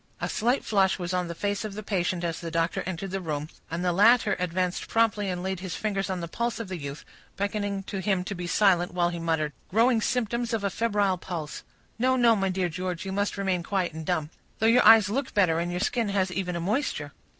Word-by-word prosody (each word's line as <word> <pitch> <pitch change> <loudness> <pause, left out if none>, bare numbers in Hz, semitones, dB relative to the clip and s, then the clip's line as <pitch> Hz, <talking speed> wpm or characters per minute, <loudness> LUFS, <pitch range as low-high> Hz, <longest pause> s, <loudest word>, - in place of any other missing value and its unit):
A - - -2
slight 245 +5 0
flush 195 -3 +2
was 175 -1 -4
on 180 -1 0
the 170 - -5
face 205 +4 -2
of 210 -2 -5
the 215 - -6
patient 180 -3 -1
as 165 -2 -2
the 170 - -5
doctor 165 +1 0
entered 185 +1 -4
the 195 0 -2
room, 155 -3 -3 0.2
and 170 +2 -3
the 180 - +2
latter 210 +2 +5
advanced 180 0 -1
promptly 220 -3 +1
and 180 -1 -3
laid 190 -1 -2
his 185 -1 -5
fingers 195 -3 -2
on 185 -2 -2
the 170 - -4
pulse 235 +7 -2
of 225 -4 -5
the 185 - -4
youth, 140 +1 -7 0.3
beckoning 200 -1 -2
to 195 0 -5
him 190 -1 0
to 195 - -4
be 175 -2 -5
silent, 180 -2 +3
while 175 -1 +2
he 170 -1 -5
muttered,— 160 -3 -1 0.2
"Growing 230 +3 +3
symptoms 235 0 -1
of 215 - -3
a 200 - 0
febrile 205 -5 +1
pulse—no, 185 - -3
no, 235 -3 +5
my 195 -2 0
dear 185 -1 0
George, 180 +1 -4
you 190 - -3
must 200 +1 -1
remain 190 -3 0
quiet 185 -1 -1
and 160 0 -6
dumb; 160 -3 -1 0.3
though 220 - 0
your 235 +2 +5
eyes 220 -2 +8
look 265 +6 -2
better, 175 -5 +3
and 170 +1 -1
your 175 0 -2
skin 225 +2 0
has 190 -2 0
even 180 -1 -2
a - - -2
moisture." 215 - -1
190 Hz, 235 wpm, -27 LUFS, 175-210 Hz, 0.3 s, eyes